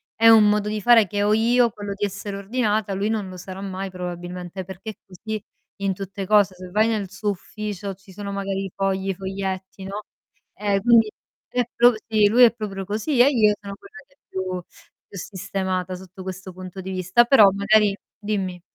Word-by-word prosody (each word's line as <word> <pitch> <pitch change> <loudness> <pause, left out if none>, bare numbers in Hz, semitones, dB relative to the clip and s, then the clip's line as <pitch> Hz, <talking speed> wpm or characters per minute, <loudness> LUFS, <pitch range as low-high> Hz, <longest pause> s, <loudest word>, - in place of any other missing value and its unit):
è 225 0 +6
un 220 -2 +8
modo 210 0 +1
di 215 0 -3
fare 225 -1 +6
che 205 +2 -1
ho 210 +1 +3
io, 235 +2 +4
quello 205 -1 -6
di 205 +1 -1
essere 200 0 -5
ordinata, 210 -1 -1
lui 200 +2 -1
non 215 -3 -1
lo 185 - -9
sarà 185 +1 -8
mai 195 0 -4
probabilmente, 180 0 -6
perché 190 +4 -7
è - - -18
così 210 +3 -6 0.4
in 195 -1 0
tutte 195 +1 -6
cose. 200 -2 +4
Se 180 0 -10
vai 215 +3 +3
nel 210 -4 -1
suo 205 +1 -1
ufficio 205 0 -6
ci 195 0 -17
sono 200 +1 -6
magari 195 -1 -3
fogli, 195 0 -1
foglietti, 190 0 -5
no, 200 +2 -5 0.5
ehm, 200 -1 0
quindi 225 -1 +5 0.4
è 245 - +1
pro 245 +1 +6
sì, 215 -2 +4
lui 245 +4 +6
è 235 - +7
proprio 205 -4 -5
così 220 +7 -1
e 260 - +7
io 220 -6 +4
sono 200 -1 -7
quella 395 - -16
che 280 - -29
è - - -68
più 190 - -4 0.7
più 200 - -11
sistemata 185 -1 -3
sotto 185 +1 -11
questo 190 0 -7
punto 185 +1 -8
di 190 +1 -6
vista. 185 +5 +3
Però 225 -6 +7
magari 200 +1 +3 0.2
dimmi. 195 -4 -3
200 Hz, 195 wpm, -23 LUFS, 190-215 Hz, 0.7 s, un